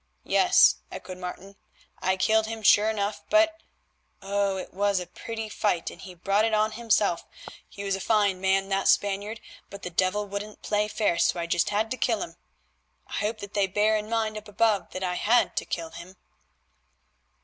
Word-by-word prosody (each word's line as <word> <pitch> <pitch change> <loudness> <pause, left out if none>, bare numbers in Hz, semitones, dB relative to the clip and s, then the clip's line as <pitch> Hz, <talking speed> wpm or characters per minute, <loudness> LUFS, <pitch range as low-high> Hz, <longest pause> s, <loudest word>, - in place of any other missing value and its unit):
"Yes," - - +5
echoed 185 0 -8
Martin, 190 +2 -8 0.4
"I 190 0 +1
killed 220 +3 +2
him 225 -1 -6
sure 210 +1 +6
enough, 205 -1 -2
but—oh! 200 -11 -1
it 185 - -7
was 200 0 +1
a 180 - -5
pretty 225 +4 -6
fight, 205 -5 -1
and - - -13
he 185 -2 -10
brought 195 +4 +1
it 220 -1 +2
on 215 +1 +2
himself. 215 -6 +1 0.5
He 200 - -8
was 195 -1 0
a - - -5
fine 205 -4 +2
man, 195 0 +2
that 195 0 0
Spaniard, 205 +2 +1 0.3
but 200 0 -10
the 180 - -5
devil 185 +4 +1
wouldn't 205 +1 -7
play 210 0 +1
fair, 205 -5 0
so 175 - +2
I 170 - -2
just 170 0 +1
had 215 +2 0
to 255 - -2
kill - - 0
him. - - -9 0.7
I - - -13
hope 215 +2 -1
that 200 0 -8
they 200 -2 +2
bear 210 +3 +2
in 215 0 -3
mind 220 -2 -1
up 210 - -17
above 210 -1 +1
that 185 - -4
I 180 -1 -1
had 225 +6 +2
to - - 0
kill 165 -1 -4
him." 180 +3 -11
205 Hz, 190 wpm, -26 LUFS, 190-215 Hz, 0.7 s, sure